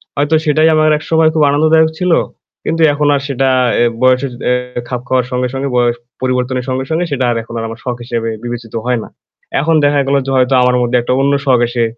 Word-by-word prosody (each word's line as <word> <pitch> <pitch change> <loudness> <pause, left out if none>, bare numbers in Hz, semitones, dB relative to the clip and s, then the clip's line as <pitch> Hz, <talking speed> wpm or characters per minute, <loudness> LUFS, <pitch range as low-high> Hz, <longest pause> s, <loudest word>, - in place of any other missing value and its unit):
হয়তো 145 +2 +1
সেটাই 155 +1 +3
আমার 155 0 +3
একসময় 160 +1 +2
খুব 155 -1 +2
আনন্দদায়ক 160 +2 +3
ছিল। 180 -1 0 0.5
কিন্তু 165 +1 -1
এখন 145 0 0
আর 140 - -1
সেটা 135 -1 0 0.3
এ্যা 120 0 +3
বয়সের 130 +1 +2 0.2
এ্যা 125 -1 -2
খাপ 125 -1 -3
খাওয়ার 130 -1 +1
সঙ্গে, 125 0 -1
সঙ্গে 135 +1 -3
বয়স 120 -1 +2 0.3
পরিবর্তনের 125 0 -1
সঙ্গে, 130 +1 -1
সঙ্গে 165 +2 0
সেটা 130 -2 0
আর 115 - -1
এখন 115 - -12
আর 115 - -4
আমার 115 +1 -8
শখ 125 -1 -2
হিসেবে 115 -1 -3
বিবেচিত 120 -2 -6
হয় 125 -2 0
না। - - -12 0.5
এখন 165 +3 +1
দেখা 145 0 +2
গেল 140 - +2
যে 135 - -3
হয়তো 130 +1 +2
আমার 125 0 +3
মধ্যে 120 +1 +1
একটা 125 +2 -1
অন্য 140 +1 +2
শখ 130 -3 +3
এসে 120 -1 -1
130 Hz, 215 wpm, -14 LUFS, 125-145 Hz, 0.5 s, সেটাই